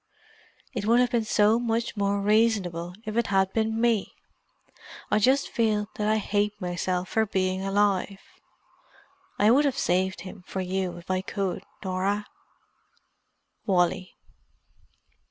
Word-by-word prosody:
It 215 -4 -3
would 235 +2 +5
have 250 -1 +2
been 235 -3 +1
so 215 +1 +3
much 230 -1 -1
more 200 -1 0
reasonable 200 -5 +1
if 215 0 -4
it 235 -1 +1
had 190 -1 +1
been 220 0 0
me. 230 -3 +1 1.0
I 210 - +4
just 265 +6 +3
feel 215 -3 0
that 210 - -2
I 215 0 +3
hate 210 0 -1
myself 180 0 -2
for 220 -1 +1
being 185 -1 0
alive. 195 -1 +1 1.2
I 210 +2 +5
would 275 +5 +5
have 275 - 0
saved 185 +2 0
him 185 0 -10
for 190 - -4
you 185 -1 -2
if 175 +2 -7
I 185 0 +1
could, 195 -1 -3 0.2
Norah, 195 +2 -1 1.4
"Wally." 180 -1 +1
205 Hz, 135 wpm, -26 LUFS, 185-220 Hz, 1.4 s, would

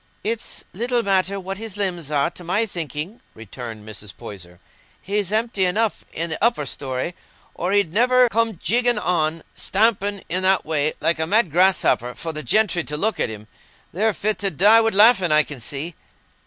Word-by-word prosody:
"It's 225 +1 -4
little 240 +4 0
matter 195 0 +1
what 195 +1 -6
his 220 -3 -7
limbs 175 -7 -2
are, 145 +2 +1
to 180 - -12
my 195 +6 +1
thinking," 170 - -6
re 115 - -11
turned 110 -1 -8
Mrs. 105 -1 -9
Poyser. 90 -3 -10 0.4
"He's 200 -1 -2
empty 220 -2 0
enough 210 +4 0 0.2
i' 165 - +2
the 160 +3 -3
upper 230 -10 +2
story, 130 +4 -4 0.4
or 180 +2 -3
he'd 200 -5 +1
niver 250 +3 +4
come 225 -2 0
jigging 240 +4 +1
an' 165 -4 0
stamping 205 -1 0
i' 180 - 0
that 190 +1 +3
way, 155 -1 +1
like 165 -1 +1
a 160 - 0
mad 205 -2 +3
grasshopper, 175 -8 +2
for 165 -1 -5
the 155 - -5
gentry 175 - +1
to 150 - -3
look 220 +7 0
at - - +1
him. 105 -1 -9 0.5
They're 215 +6 +1
fit 215 +1 -2
to 200 - +1
die 205 +7 +5
wi' 225 - +2
laughing, 205 -4 +5
I 155 0 +6
can 145 -3 -9
see." 145 +8 -4
185 Hz, 185 wpm, -22 LUFS, 155-215 Hz, 0.5 s, I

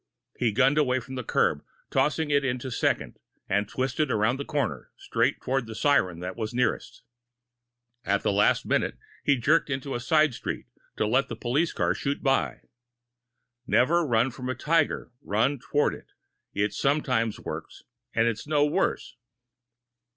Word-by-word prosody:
He 120 -3 +1
gunned 135 +7 +3
away 130 -3 +2
from 130 +2 -10
the 130 -1 -4
curb, - - +1 0.3
tossed 135 +2 +2
it 145 -3 +1
into 130 0 -2
second, - - -1 0.3
and 100 +1 0
twisted 135 +3 -1
around 110 +3 +1
the 140 - -4
corner, 145 -6 -2
straight - - 0
toward 130 -2 -1
the 110 - -7
siren 95 - +2
that 90 +1 -5
was 110 0 -4
nearest. 125 - -1 1.0
At 100 0 0
the - - +2
last 100 +1 +3
minute, - - 0 0.3
he 140 - +4
jerked 150 +7 +3
to 135 -2 -1
the 135 -2 -4
side 155 +4 +3
of - - -12
the - - -8
street, - - -5 0.3
to - - +1
let 130 +5 +2
the - - -4
police 145 +8 0
car 85 0 +1
shoot 140 +8 -3
by. 135 -2 +1 1.1
"Never 170 +9 +3
run 120 -2 +2
from 125 +1 -6
a 130 - -1
tiger 150 0 0
run 125 +7 +1
toward 145 +4 +1
it. - - -11 0.4
It 105 +1 -1
sometimes 125 -6 0
works, - - -7 0.3
and 115 - +2
it's 115 +3 -2
no 145 -1 +3
worse." 150 - -1
130 Hz, 165 wpm, -27 LUFS, 115-145 Hz, 1.1 s, he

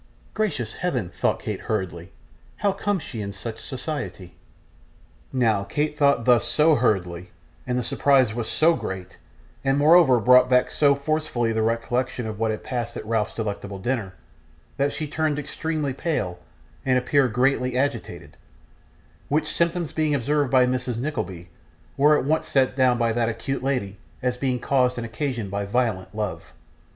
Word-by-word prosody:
'Gracious 145 - -2
Heaven!' 125 - -2
thought - - 0
Kate - - -4
hurriedly. 95 -4 -4 0.5
'How 205 - +1
comes 195 -4 -1
she 115 - -6
in 100 -1 -4
such 110 +3 -7
society?' 125 - -5 1.0
Now, 110 -6 +2
Kate 150 +9 -2
thought 140 -5 +3
thus 120 -2 +5
SO 150 +6 +4
hurriedly, 90 - 0 0.4
and 125 - 0
the 125 - 0
surprise 130 -2 +3
was 115 -1 -3
so 165 +2 +4
great, 95 - -6 0.4
and 135 0 +2
moreover 150 -4 +6
brought 125 +3 +6
back 125 -1 +3
so 140 -2 +4
forcibly 140 -5 -1
the 110 - 0
recollection 120 +2 -1
of 110 -1 -5
what 115 0 +1
had 110 - -3
passed 120 -2 -4
at - - -6
Ralph's 110 -2 -1
delectable 100 -2 -4
dinner, 100 -3 -3 0.6
that 140 +1 +1
she 155 +2 -4
turned 155 0 -1
extremely 150 -1 -3
pale 105 - -2 0.4
and 130 -1 +2
appeared 125 -1 +2
greatly 125 0 +1
agitated, 140 +2 -3 0.9
which 155 +1 0
symptoms 170 -1 0
being 155 -2 +1
observed 145 +1 +1
by 130 -1 +5
Mrs. 125 -1 -2
Nickleby, 95 - -4 0.5
were 150 +2 +5
at - - -2
once 155 +3 0
set 130 -2 +2
down 130 -2 +3
by 115 -1 +1
that 115 0 +1
acute 115 +5 -3
lady 125 -8 -1 0.3
as 125 -1 +1
being 125 -1 -1
caused 125 0 +1
and 120 - -3
occasioned 115 -3 -3
by 100 0 -2
violent 105 -3 -1
love. 105 -3 -4
125 Hz, 160 wpm, -24 LUFS, 110-145 Hz, 1.0 s, moreover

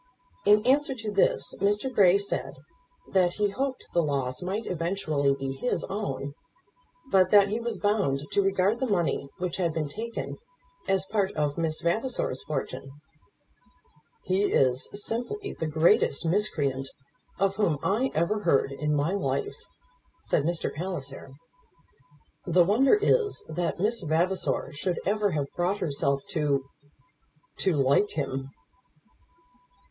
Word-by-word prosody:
In 210 +1 +5
answer 275 +1 +3
to 220 -4 -5
this 200 -1 +2
Mr. 205 +6 +1
Grey 190 -3 +6
said 200 0 -3 0.5
that 180 -2 +2
he 205 -1 +1
hoped 265 +5 -3
the 175 - +4
loss 135 -4 -2
might 195 +5 -3
eventually 160 -5 0
be 135 -1 -4
his 245 - -2
own; 140 -9 -3 0.8
but 190 -1 +5
that 200 -1 +6
he 215 +3 -1
was 230 -4 -3
bound 205 -10 +1
to 200 - +3
regard 195 +3 +1
the 260 - 0
money 170 -7 0
which 180 -1 -3
had 170 -4 0
been 155 -2 -1
taken 225 +9 -5 0.5
as 195 -1 +1
part 200 -3 +1
of 150 -2 -1
Miss 160 -2 -2
Vavasor's 195 - -1
fortune. 135 -2 -4 1.3
"He 190 +2 +1
is 130 -1 +2
simply 245 - -3
the 160 - -3
greatest 155 0 +3
miscreant 150 -8 0 0.5
of 195 0 +1
whom 175 -8 +2
I 235 +7 +1
ever 170 +7 +1
heard 165 -8 +2
in 150 +2 -1
my 145 +4 +1
life," 410 - -1 0.7
said 145 - 0
Mr. 170 0 -1
Palliser. 145 -5 -5 1.2
"The 175 0 +5
wonder 245 - +5
is 430 0 +1
that 170 +2 -2
Miss 220 +4 +1
Vavasor 170 -2 0
should 175 +5 -2
ever 205 +2 +1
have 145 -2 0
brought 180 +3 0
herself 140 -5 -1
to 145 -5 0 0.9
to 190 - +1
like 140 +9 +3
him." 135 -2 -3
180 Hz, 135 wpm, -27 LUFS, 150-210 Hz, 1.3 s, Grey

